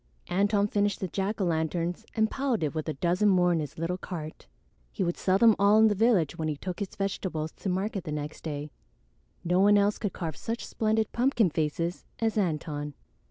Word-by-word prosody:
Antone 200 +2 +2
finished 205 -1 0
the 190 - -2
jack 195 +5 -2
o' - - +1
lantern 170 0 0 0.2
and 220 -1 +2
piled 265 -8 0
it 150 - -1
with 155 0 -3
a 155 - -3
dozen 180 +7 +2
more 180 -2 +4
in 165 - +1
his 150 -2 -5
little 170 +3 -2
cart. 160 -5 -7 0.4
He 195 - -2
would 175 -1 0
sell 185 0 +2
them 225 0 +6
all 200 +2 +5
in 220 0 +6
the - - +2
village 195 - +2
when 160 - -1
he 150 -2 -2
took 180 +4 -5
his 200 -3 -5
vegetables 180 -5 -2
to 195 - -3
market 190 +1 -2
the 155 - -4
next 150 0 -5
day; 150 -1 -5 0.7
no 180 +1 +2
one 205 +1 +6
else 205 +1 +2
could 205 -4 -2
carve 160 -4 -4
such 230 +1 -4
splendid 220 0 0
pumpkin 235 - +2
faces 165 +3 -2
as 225 -1 0
Antone. 150 -6 -2
185 Hz, 205 wpm, -28 LUFS, 160-205 Hz, 0.7 s, them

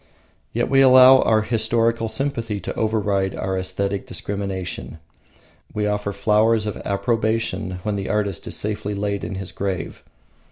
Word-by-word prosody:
Yet - - 0
we 135 0 +4
allow 130 0 +8
our 110 -1 +3
historical 115 0 +1
sympathy 115 -6 -3
to - - -4
override 105 -3 0
our 95 0 -2
aesthetic 95 +1 -2
discrimination. 100 -5 -4 0.8
We 105 0 0
offer 105 0 -1
flowers 105 +2 +2
of 105 - -4
approbation 110 -2 -1
when 105 -1 -1
the 95 - -4
artist 100 -2 -1
is - - -4
safely 105 0 -3
laid 100 0 -2
in 95 - -4
his 95 -1 -6
grave. 95 -4 -4
105 Hz, 145 wpm, -22 LUFS, 100-115 Hz, 0.8 s, allow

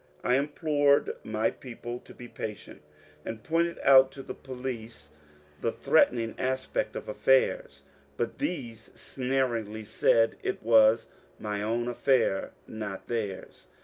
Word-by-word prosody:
I 125 - +2
implored 145 +1 +2
my 110 +1 0
people 120 -1 -8
to - - -13
be 120 - -10
patient, 105 -8 -7 0.4
and 110 -1 -6
pointed 170 +1 0
out 135 -1 +7
to 135 - -9
the - - -6
police 125 - -7 0.5
the - - 0
threatening 115 -2 +2
aspect 130 - -1
of - - -6
affairs; - - +1 0.3
but - - -3
these 120 - -4
sneeringly 120 -5 -2
said 115 +1 +2
it - - -3
was 110 0 +5 0.3
my 105 -1 -3
own 115 +3 -1
affair, 120 -5 +1 0.2
not 105 -3 -7
theirs. 105 -5 -4
120 Hz, 125 wpm, -28 LUFS, 110-140 Hz, 0.5 s, out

